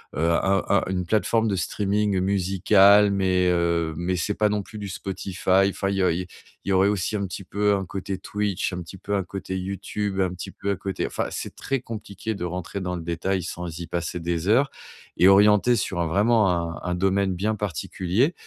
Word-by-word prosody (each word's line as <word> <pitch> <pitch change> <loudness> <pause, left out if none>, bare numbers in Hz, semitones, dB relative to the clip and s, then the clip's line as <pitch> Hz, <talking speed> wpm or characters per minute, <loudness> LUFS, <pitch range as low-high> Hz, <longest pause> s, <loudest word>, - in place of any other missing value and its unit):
heu, 80 +3 +1
un 95 +3 +2
un 100 - +3
une 90 -1 -1
plateforme 110 +3 +1
de 100 - 0
streaming 100 +3 0
musical 100 +2 +4
mais, 95 -2 +2
heu, 85 -2 +1
mais 90 +2 -1
c'est 95 +4 -1
pas 105 - +2
non 105 -1 -1
plus 110 +1 -11
du 100 -1 -5
Spotify 95 0 0
enfin, 95 0 -2
il 100 - -1
y - - +1
a - - +3
il 85 - -1
y 90 - -7 0.4
il - - -5
y - - +2
aurait 95 +1 +4
aussi 105 +1 -1
un 100 -1 -2
petit 95 +2 -7
peu 105 +3 +1
un 95 -1 -2
côté 95 +1 -4
Twitch, 100 -1 -2
un 90 - -4
petit 85 +3 -10
peu 100 +2 -5
un 100 - 0
côté 95 0 -6
YouTube, 100 +1 -3
un 90 -1 0
petit 90 - -7
peu 100 - -3
un - - 0
côté, 95 0 -3
enfin, - - -2
c'est - - -6
très 135 0 -2
compliqué 110 -2 -6
de 100 - -6
rentrer 90 +2 -4
dans 90 -1 -3
le 85 - -6
détail 85 +2 -1
sans 85 -1 -6
y 85 - -5
passer 85 +1 -3
des 85 +1 -2
heures 130 +7 +3 0.5
et 90 - +6
orientée 105 +4 +6
sur 90 -6 -1
vraiment 105 +4 +3
un 85 -2 -1
un 90 - 0
domaine 95 +1 +1
bien 105 +4 -1
particulier 100 - -1
95 Hz, 220 wpm, -24 LUFS, 90-100 Hz, 0.5 s, et